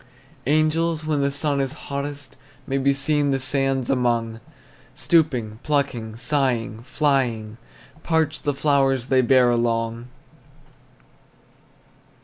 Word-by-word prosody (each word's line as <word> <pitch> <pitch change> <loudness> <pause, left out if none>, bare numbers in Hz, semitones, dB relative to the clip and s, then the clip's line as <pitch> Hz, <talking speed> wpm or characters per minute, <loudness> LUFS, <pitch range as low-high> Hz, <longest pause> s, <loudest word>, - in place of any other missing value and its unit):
Angels 155 +2 +1
when 150 -2 0
the 140 - +2
sun 140 0 0
is 135 -1 -3
hottest 140 0 -6 0.3
May 135 +1 -1
be 140 +1 +3
seen 145 +1 +1
the 135 - +1
sands 135 -1 0
among, 120 -3 0 0.6
Stooping, 125 -10 +1
plucking, 130 -7 -1
sighing, 120 -4 -1
flying; 125 -5 -1 0.4
Parched 160 -2 0
the 145 -2 -1
flowers 135 -3 +1
they 130 -1 +4
bear 125 0 +4
along. 115 0 -1
135 Hz, 110 wpm, -22 LUFS, 120-145 Hz, 0.6 s, they